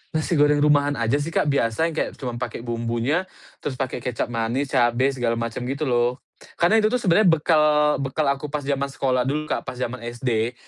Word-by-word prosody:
Nasi 155 0 0
goreng 145 0 +4
rumahan 145 -1 +3
aja 120 +4 0
sih 145 - -3
Kak, 145 - +2
biasa 115 +1 +1
yang - - -9
kayak - - -1
cuman 120 -3 -5
pakai 120 - -5
bumbunya, 120 +9 -1 0.3
terus 130 - -4
pakai 130 -1 -3
kecap 120 0 -3
manis, 120 +4 -2
cabe, 120 +3 +2
segala 120 -3 -1
macam, 115 +1 -3
gitu 140 +3 -3
loh. 120 -2 +1 0.4
Karena 200 +6 +4
itu 215 - +3
tuh 250 - 0
sebenernya 190 +2 +4
bekal 150 -2 +3
bekal 140 +3 -1
aku 140 +2 -4
pas 145 0 -3
zaman 140 0 -1
sekolah 130 -2 0
dulu 155 +2 -2
Kak - - -2
pas - - -4
jaman 125 0 -4
SD, 120 -1 -1
135 Hz, 200 wpm, -23 LUFS, 120-150 Hz, 0.4 s, goreng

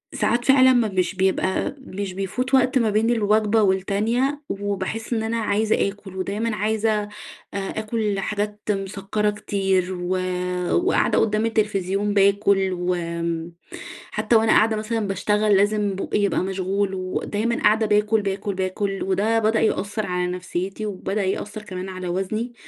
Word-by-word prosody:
ساعات 240 +1 +1
فعلًا 260 -1 +6
م 220 -6 +1
مش 185 +1 0
بيبقى 190 +5 0
مش 200 -6 -6
بيفوت 230 +8 -3
وقت 255 +1 +3
ما 230 -3 +2
بين 215 +2 +2
الوجبة 215 -1 +2
والتانية، 215 +9 0
وباحس 205 +3 -3
إن 220 -1 0
أنا 230 +1 -1
عايزة 215 -1 +1
آكل، 195 -2 -11
ودايمًا 210 +4 -2
عايزة 220 +1 0
آآ 205 - -9 0.4
آكل 210 +1 -2
حاجات 210 +1 -3
مسكّرة 195 +1 -1
كتير، 195 -3 0
و 185 +1 -1 0.5
وقاعدة 360 +2 +2
قُدّام 215 0 +1
التلفزيون 205 -2 0
باكل، 200 -1 +3
وآمم، 170 -2 -2 0.6
حتى 235 - +1
وأنا 220 0 +4
قاعدة 220 +1 +4
مثلًا 215 0 -2
باشتغل 210 +2 +2
لازم 205 0 +1
بوقى 195 - -1
يبقى 200 -1 +1
مشغول، 190 +1 -1
ودايمًا 205 +5 -2
قاعدة 220 +1 +4
باكل، 210 +1 +2
باكل، 200 0 -3
باكل. 195 +1 -2
وده 205 +4 +1
بدأ 220 0 +2
يأثر 210 0 0
على 180 0 -1
نفسيتي، 185 +3 -4
وبدأ 205 0 -2
يأثر 205 +3 -3
كمان 185 -2 -6
على 185 -1 -6
وزني، 215 +7 -2
205 Hz, 145 wpm, -23 LUFS, 190-220 Hz, 0.6 s, فعلًا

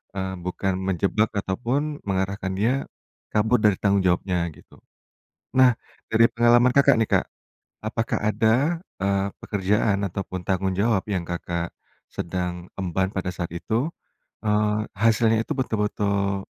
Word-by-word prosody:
eee, 95 0 -2
bukan 90 +2 -2
menjebak 95 +3 +1
ataupun 125 +10 -1
mengarahkan 95 0 -1
dia 110 +6 +2 0.6
kabur 110 +3 +3
dari 105 -2 +4
tanggung 100 -1 +2
jawabnya, 90 -1 +1
gitu. - - -19 0.7
Nah, 130 -2 +5 0.3
dari 115 +1 +5
pengalaman 120 +1 +5
Kakak 140 -1 +5
nih, 115 -1 +1
Kak. - - -9 0.6
Apakah 115 +1 -1
ada, 115 +10 +2 0.2
eee, 100 0 +1 0.2
pekerjaan 105 +1 +1
ataupun 95 -1 -5
tanggung 95 0 0
jawab 105 -2 +2
yang 90 -4 -1
Kakak 85 -1 -4 0.3
sedang 90 0 -4
emban 95 +1 0
pada 95 -2 -3
saat 85 -2 -4
itu, 110 - -1 0.5
eee, 105 0 +2
hasilnya 115 +1 +3
itu - - -2
betul-betul, 100 -4 0
100 Hz, 125 wpm, -24 LUFS, 95-115 Hz, 0.7 s, Nah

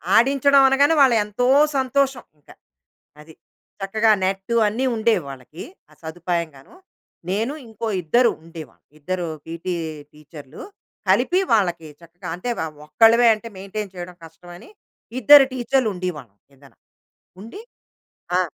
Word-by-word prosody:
ఆడించడం 275 +3 +4
అనగానే, 280 +4 +3
వాళ్ళ 265 -3 +5
ఎంతో 210 +4 -2 0.3
సంతోషం 265 0 0 0.2
ఇంక. 145 - -29 0.7
అది. 160 +1 -16 0.5
చక్కగా 215 +3 +1
నెట్టూ 195 +4 -2
అన్నీ 230 +6 -2
ఉండేవి 220 -5 +1
వాళ్ళకీ, 135 +5 -10 0.3
ఆ - - -19
సదుపాయంగాను. 165 - -5 0.5
నేను 220 +8 -1
ఇంకో 225 0 -6 0.2
ఇద్దరు 235 +9 +3
ఉండేవాళ్ళం. 165 -4 -12
ఇద్దరు 180 +3 -4 0.2
పీటీ 170 +2 -5 0.4
టీచర్‌లు 150 -1 -13 0.5
కలిపి 360 - +3
వాళ్ళకి 175 -7 +1
చక్కగా 175 +2 -11
అంటే 180 +8 -6
వ - - -1 0.2
ఒక్కళ్ళమే 230 +8 +4
అంటే 215 +2 -11
మెయింటేన్ 195 +1 -7
చేయడం 180 0 -8
కష్టమని, 175 - -14 0.5
ఇద్దరు 275 +3 +8
టీచర్‌లుండేవాళ్ళం 185 - -2 0.2
ఎదర. 135 0 -20 0.7
ఉండి 230 - -10 0.8
ఆ! - - +3
195 Hz, 115 wpm, -21 LUFS, 165-240 Hz, 0.8 s, ఇద్దరు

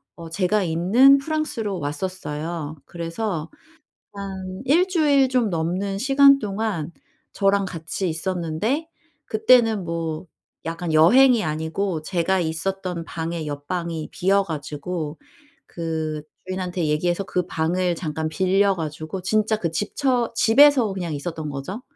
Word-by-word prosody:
어 165 -1 -9
제가 190 +4 +1
있는 190 +12 +5
프랑스로 275 - -2
왔었어요. 155 0 -4
그래서 170 0 -4 0.6
한 190 -1 -6
1 335 +8 +4
주일 295 -7 +3
좀 250 -4 +1
넘는 180 +4 -1
시간 275 +3 +6
동안 200 - -3 0.4
저랑 200 0 +2
같이 180 +1 -4
있었는데 180 - -2 0.4
그때는 225 -2 +4
뭐 165 0 -4 0.4
약간 165 0 -3
여행이 235 +9 +6
아니고 160 +3 -2
제가 180 +3 0
있었던 180 +1 -2
방에 165 -1 -4
옆 145 -1 -6
방이 170 -3 -3
비어 195 +2 +2
가지고 155 0 -5 0.5
그 160 -2 -3 0.2
주인한테 180 -2 -2
얘기해서 175 +5 0
그 180 -2 -2
방을 175 +2 0
잠깐 160 -1 -3
빌려 195 +3 +2
가지고 160 +2 -5
진짜 215 +3 +1
그 170 -5 -2
집처 240 - 0
집에서 250 -1 +5
그냥 175 -4 -4
있었던 155 +1 -4
거죠. 145 - -6
180 Hz, 260 characters per minute, -23 LUFS, 160-210 Hz, 0.6 s, 시간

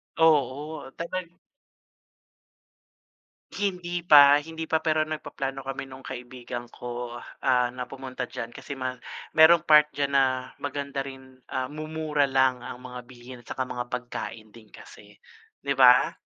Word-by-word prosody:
Oo 150 -2 +1
talag 175 +2 -4 2.3
Hindi 180 -3 -2
pa, 145 -3 +9
hindi 160 0 -6
pa, 160 - 0
pero 155 -1 +1
nagpaplano 135 -3 -5
kami 135 0 -5
no'ng 130 0 -12
kaibigan 120 -1 -7
ko, 120 0 -6 0.2
ah, 125 -2 +2
na 125 0 -6
pumunta 130 -2 -6
diyan, 120 -1 -6
kasi 145 - -8
ma 130 -1 -2 0.4
merong 160 +1 +7
part 150 -2 +7
diyan 140 -1 0
na 135 -1 +5 0.3
maganda 140 0 -4
rin, 130 -1 -8
ah, 130 +1 -3
mumura 155 -1 -1
lang 130 -1 +2
ang 125 - -7
mga 125 -1 -7
bilhin 125 0 -12
at 120 - -20
tsaka 130 - -2
mga 125 -1 -5
pagkain 115 -3 -6
din 110 -1 -16
kasi, - - -15 0.5
'di 140 - -2
ba? 125 -1 +7
135 Hz, 140 wpm, -26 LUFS, 125-155 Hz, 2.3 s, pa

